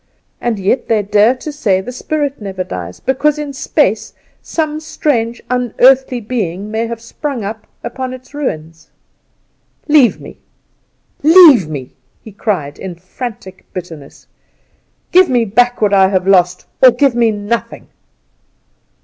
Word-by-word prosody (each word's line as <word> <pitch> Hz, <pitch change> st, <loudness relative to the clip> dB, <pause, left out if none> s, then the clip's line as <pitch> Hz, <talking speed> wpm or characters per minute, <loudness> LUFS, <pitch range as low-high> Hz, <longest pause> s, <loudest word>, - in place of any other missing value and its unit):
And 235 Hz, -3 st, -1 dB
yet 200 Hz, +6 st, 0 dB
they 220 Hz, -2 st, +1 dB
dare 210 Hz, +4 st, +3 dB
to 280 Hz, +4 st, -7 dB
say 210 Hz, -10 st, 0 dB
the 230 Hz, +6 st, -6 dB
spirit 285 Hz, 0 st, -3 dB
never 190 Hz, -2 st, -4 dB
dies, 90 Hz, -, -7 dB
because 280 Hz, +3 st, 0 dB
in 295 Hz, -2 st, -5 dB
space 265 Hz, -, 0 dB, 0.3 s
some 310 Hz, -2 st, -3 dB
strange 240 Hz, -7 st, -2 dB
unearthly 250 Hz, +1 st, +3 dB
being 210 Hz, -4 st, -4 dB
may 225 Hz, +1 st, -1 dB
have 230 Hz, -1 st, -6 dB
sprung 245 Hz, +1 st, -5 dB
up 215 Hz, +1 st, -6 dB, 0.2 s
upon 255 Hz, +2 st, -5 dB
its 255 Hz, +2 st, -11 dB
ruins. 160 Hz, -, -5 dB, 1.0 s
Leave 295 Hz, -6 st, +4 dB
me! -, -, -12 dB, 0.8 s
Leave 300 Hz, -, +7 dB
me!" 140 Hz, -5 st, -7 dB, 0.3 s
he 220 Hz, -, -13 dB
cried 185 Hz, -8 st, -3 dB
in 185 Hz, -2 st, -6 dB
frantic 190 Hz, +1 st, -9 dB
bitterness. 165 Hz, -6 st, -9 dB, 0.9 s
"Give 365 Hz, 0 st, +5 dB
me 245 Hz, -3 st, +2 dB
back 245 Hz, +4 st, +1 dB
what 205 Hz, -1 st, +2 dB
I 190 Hz, -1 st, +5 dB
have 185 Hz, -1 st, 0 dB
lost, 180 Hz, -2 st, +3 dB, 0.2 s
or 260 Hz, -, +9 dB
give 275 Hz, +1 st, +2 dB
me 235 Hz, -1 st, +2 dB
nothing." 210 Hz, +2 st, -4 dB
230 Hz, 140 wpm, -15 LUFS, 190-260 Hz, 1.0 s, or